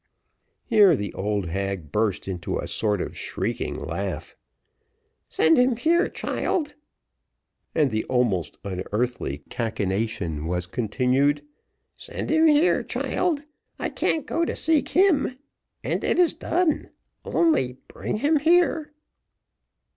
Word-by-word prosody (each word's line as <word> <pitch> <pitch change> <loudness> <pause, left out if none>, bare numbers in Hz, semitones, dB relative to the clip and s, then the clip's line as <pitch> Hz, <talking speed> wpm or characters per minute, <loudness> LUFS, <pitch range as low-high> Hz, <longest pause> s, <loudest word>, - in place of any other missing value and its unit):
Here 205 -7 +6
the 100 -5 -4
old 100 0 -1
hag 95 -3 -3
burst 105 -2 0
into 90 -3 -3
a - - -4
sort 105 -4 0
of - - -5
shrieking - - -3
laugh. - - -4 0.9
"Send 160 +6 +4
him 250 0 +4
here, 340 - +3
child;" 300 -4 -2 1.0
and 150 -5 +3
the 110 0 0
almost 115 - 0
unearthly 100 - -3
cachinnation 100 -7 -2
was 90 +1 -1
continued 130 +8 +1 0.5
"send - - -6
him 320 +1 +5
here, 305 +3 +4
child 315 -5 -1 0.3
I - - -2
can't 315 - 0
go 335 - 0
to - - -1
seek 315 -2 +1
him 350 -8 +3 0.5
and - - -1
it - - +2
is 355 -2 +4
done 330 -1 0 0.3
only 310 - +2
bring 205 - -4
him 295 +6 +2
here." 325 -1 +2
130 Hz, 120 wpm, -24 LUFS, -, 1.0 s, Here